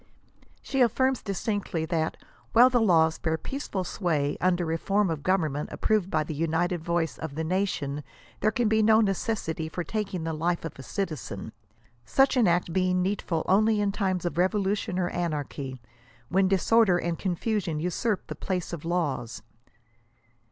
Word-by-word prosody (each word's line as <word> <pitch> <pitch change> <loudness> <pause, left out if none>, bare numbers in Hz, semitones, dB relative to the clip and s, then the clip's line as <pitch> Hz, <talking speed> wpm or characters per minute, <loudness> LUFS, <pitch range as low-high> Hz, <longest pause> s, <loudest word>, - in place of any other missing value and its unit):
She 270 - -2
aflirms 260 +2 +2
distinctly 200 -4 -2
that 160 -1 -1 0.2
" - - -31
while 245 +3 +7
the 245 -2 +3
laws 160 -6 +4
bear 160 -1 0
peaceful 235 - -4
sway, 155 -7 -1
under 175 -2 +1
a 165 - +1
form 200 -1 +1
of 155 -3 -3
government 155 -4 0
approved 210 -4 +1
by 155 -3 +1
the 155 - -5
united 165 +2 0
voice 170 -1 -1
of 160 -3 -5
the 160 - -2
nation 160 -5 -1 0.4
there - - +3
can 230 +1 0
be 220 0 +3
no 220 0 +5
necessity 195 -6 -1
for 175 +2 -4
taking 195 -4 -3
the 160 0 -2
life 170 +2 -1
of 165 - -5
a - - -5
cittzen 155 -1 -4 0.3
;" 120 +1 -35
such 270 0 +5
an 240 -5 +4
act 175 -1 +1
being 185 -1 +2
needful 185 -4 -1
only 215 +3 +4
in 205 -1 +1
times 190 -3 -1
of 175 -1 -2
revolution 195 0 0
or 180 -1 0
anarchy, 145 -6 -3 0.5
when 190 +1 +3
disorder 195 0 +4
and 170 -1 -2
confusion 185 -3 -1
usurp 180 +5 -1
the - - -6
place 180 -2 -3
of 165 - -5
laws." 145 -10 -2
180 Hz, 170 wpm, -27 LUFS, 160-205 Hz, 0.5 s, while